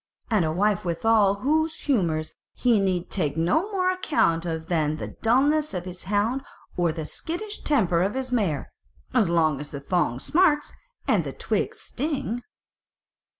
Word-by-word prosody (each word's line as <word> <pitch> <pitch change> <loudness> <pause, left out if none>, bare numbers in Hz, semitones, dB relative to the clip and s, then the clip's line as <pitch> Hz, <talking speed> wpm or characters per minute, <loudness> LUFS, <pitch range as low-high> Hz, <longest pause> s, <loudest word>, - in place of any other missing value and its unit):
and 210 -5 +3
a 155 - 0
wife 200 +3 +1
withal 200 +4 +3
of 200 - -10
whose 315 +3 +1
humours 165 - 0 0.2
he 240 -4 +3
need 185 -3 0
take 155 -6 -1
no 200 - +1
more 370 -2 +2
account 175 - +1
of 160 -1 -3
than 155 -3 0
the - - -5
dullness 285 +4 +3
of 180 0 -3
his 180 -1 -8
hound 210 +6 +1 0.3
or 175 -2 +2
the 160 -1 -5
skittish 380 - -5
temper 190 - +2
of 195 +6 0
his 260 -1 -2
mare, 195 - 0 0.4
so 250 - +4
long 160 -4 +2
as 145 - -7
the 140 - -6
thong 140 -4 0
smarts, 305 - +2 0.3
and - - +3
the - - -5
twigs - - -2
sting." 260 -4 -3
200 Hz, 165 wpm, -25 LUFS, 165-275 Hz, 0.4 s, so